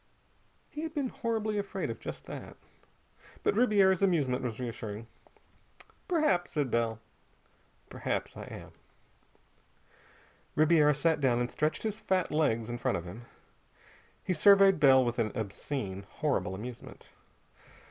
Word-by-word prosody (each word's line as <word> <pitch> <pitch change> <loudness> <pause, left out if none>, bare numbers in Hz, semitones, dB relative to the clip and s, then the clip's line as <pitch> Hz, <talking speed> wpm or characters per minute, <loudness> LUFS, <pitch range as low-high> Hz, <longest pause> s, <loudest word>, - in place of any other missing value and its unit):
He 300 - -6
had 320 0 -5
been 280 -4 -1
horribly 220 -3 -2
afraid 200 - -3
of - - -8
just - - -7
that. - - -8 0.9
But 420 - +2
Ribiera's 200 -6 +4
amusement 150 -10 +2
was 120 -2 -4
reassuring. 115 -3 -5 1.0
"Perhaps," 305 - +2
said 145 -5 -1
Bell. 115 -1 0 0.9
"Perhaps - - -3
I - - -7
am." - - -10 1.8
Ribiera 155 -1 +5
sat 160 +1 +1
down 125 -3 +3
and 120 0 -1
stretched 155 +1 -1
his 215 -1 -3
fat 185 -4 0
legs 115 -8 +1
in 120 0 -5
front - - 0
of 85 - -7
him. 105 +7 -9 1.0
He 185 - 0
surveyed 195 +1 +6
Bell 135 -3 +6
with 120 +1 -2
an 110 -2 0
obscene, 100 -2 -4
horrible 140 -11 -1
amusement. 120 +4 -9
150 Hz, 130 wpm, -30 LUFS, 120-195 Hz, 1.8 s, surveyed